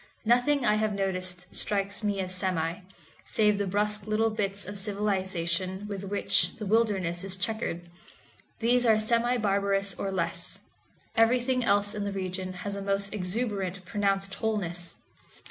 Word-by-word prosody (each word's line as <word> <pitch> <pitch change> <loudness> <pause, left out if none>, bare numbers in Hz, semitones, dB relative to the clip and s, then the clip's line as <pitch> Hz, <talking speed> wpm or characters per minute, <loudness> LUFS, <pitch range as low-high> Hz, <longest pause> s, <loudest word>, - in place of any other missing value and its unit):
Nothing 245 +4 +3
I 210 -2 +4
have 215 -1 0
noticed 185 -2 -1
strikes 200 +1 -1
me 205 -1 0
as 185 0 -2
semi, 180 -3 -1 0.4
save 210 -2 +2
the 200 - 0
brusque 210 +1 +1
little 220 +1 +2
bits 200 -2 -2
of 205 +1 -5
civilization 190 -2 -1
with 200 -1 -5
which 200 +1 +2
the 215 - -6
wilderness 195 -5 +1
is 195 -1 -1
checkered. 185 -3 -3 0.7
These 245 +2 +3
are 225 -3 +5
semi 235 +3 +2
barbarous 200 -2 +2
or 195 +2 -3
less; 175 -3 -1 0.6
everything 250 +2 +3
else 205 -1 +2
in 210 -1 -3
the 200 - -2
region 185 -1 -4
has 200 0 -1
a 200 - -4
most 195 0 +1
exuberant 195 -2 -2
pronounced 195 0 0
wholeness. 175 -6 -2
200 Hz, 145 wpm, -28 LUFS, 190-215 Hz, 0.7 s, are